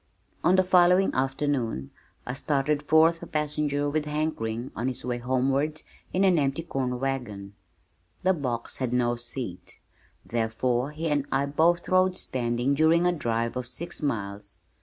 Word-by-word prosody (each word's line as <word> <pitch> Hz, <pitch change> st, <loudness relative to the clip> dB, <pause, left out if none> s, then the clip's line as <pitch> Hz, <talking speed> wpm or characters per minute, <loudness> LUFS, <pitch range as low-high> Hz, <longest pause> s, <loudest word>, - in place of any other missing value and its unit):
On 175 Hz, +3 st, +5 dB
the 185 Hz, -, +5 dB
following 180 Hz, +1 st, +4 dB
afternoon 135 Hz, -, -1 dB, 0.3 s
I 125 Hz, -, -3 dB
started 145 Hz, +1 st, 0 dB
forth 160 Hz, +2 st, +4 dB
a 170 Hz, -, -7 dB
passenger 150 Hz, -1 st, -1 dB
with 150 Hz, +1 st, -1 dB
Hank 155 Hz, +1 st, -1 dB
Ring 115 Hz, +3 st, -3 dB
on 120 Hz, +3 st, -2 dB
his 125 Hz, -2 st, -4 dB
way 120 Hz, -1 st, -2 dB
homeward 135 Hz, +5 st, 0 dB, 0.3 s
in 185 Hz, -, +1 dB
an 185 Hz, -4 st, +4 dB
empty 140 Hz, +3 st, 0 dB
corn 130 Hz, -6 st, -2 dB
wagon. 120 Hz, -7 st, -3 dB, 0.7 s
The 190 Hz, +1 st, +4 dB
box 125 Hz, -8 st, -3 dB
had 125 Hz, -2 st, -1 dB
no 120 Hz, -1 st, +2 dB
seat, 120 Hz, -5 st, -5 dB, 0.5 s
therefore 120 Hz, +3 st, 0 dB
he 155 Hz, +2 st, -4 dB
and 145 Hz, -1 st, 0 dB
I 135 Hz, +1 st, +2 dB
both 165 Hz, +4 st, +2 dB
rode 185 Hz, 0 st, +3 dB
standing 120 Hz, 0 st, -1 dB
during 160 Hz, +4 st, +4 dB
a 180 Hz, -, +4 dB
drive 115 Hz, -7 st, -1 dB
of 125 Hz, -1 st, -3 dB
six 155 Hz, +10 st, -5 dB
miles. 100 Hz, -7 st, -3 dB
135 Hz, 160 wpm, -27 LUFS, 120-155 Hz, 0.7 s, On